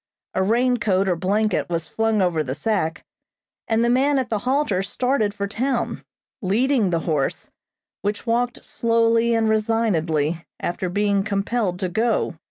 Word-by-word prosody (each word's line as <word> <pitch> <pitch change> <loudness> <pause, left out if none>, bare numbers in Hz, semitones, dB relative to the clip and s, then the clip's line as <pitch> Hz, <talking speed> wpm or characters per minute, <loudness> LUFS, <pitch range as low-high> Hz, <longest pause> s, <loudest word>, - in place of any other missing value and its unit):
A 190 - 0
rain 245 +5 +2
coat 195 -4 +1
or 180 - +2
blanket 205 +4 0
was 165 -2 -2
flung 225 -2 +1
over 170 -4 +1
the 130 -1 -4
sack, 165 -1 -1 0.6
and 225 +1 +2
the - - +2
man 275 +3 +3
at 255 -3 -1
the 215 - +1
halter 265 -9 +1
started 215 +2 0
for 200 -1 -3
town, 240 +4 -2 0.4
leading 225 +2 +2
the 170 -2 0
horse, 150 -5 -2 0.5
which 205 +2 -2
walked 240 +1 -1
slowly 230 0 +2
and 225 -1 +2
resignedly 175 -8 +1 0.2
after 175 +1 -2
being 200 +1 +1
compelled 200 -1 -1
to 185 - 0
go. 220 +3 0
210 Hz, 155 wpm, -22 LUFS, 185-230 Hz, 0.6 s, man